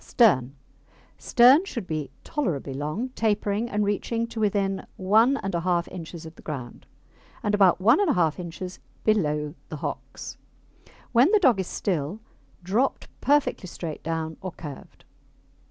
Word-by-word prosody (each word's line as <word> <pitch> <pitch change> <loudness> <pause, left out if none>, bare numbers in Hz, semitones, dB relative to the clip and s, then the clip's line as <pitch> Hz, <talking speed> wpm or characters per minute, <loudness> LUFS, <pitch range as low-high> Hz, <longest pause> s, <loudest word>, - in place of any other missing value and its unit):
STERN 140 - +3 0.6
Stern 255 +7 +6
should 235 - -5
be 155 -5 -3
tolerably 165 - -2
long, 155 - -3
tapering, 215 -1 0
and 210 -1 0
reaching 230 +3 -1
to 230 -1 -7
within 200 -2 0
1 220 +8 +4
1/2 175 -6 0
inches 170 -2 -8
of 160 - -9
the - - -16
ground, 130 -6 -7 0.6
and 210 - 0
about 195 -4 +5
1 230 - +5
1/2 180 - +2
inches 180 +1 -6 0.2
below 150 -8 +1 0.2
the - - -5
hocks. - - -6 0.7
When 250 +6 +5
the 425 - +5
dog 260 - +4
is 190 - -2
still, 175 +1 -2 0.4
dropped 220 +9 0
perfectly 280 -8 +2
straight 165 -2 -6
down, 160 0 -3
or 185 -2 -5
curved. 145 -4 -10
195 Hz, 140 wpm, -26 LUFS, 160-230 Hz, 0.7 s, Stern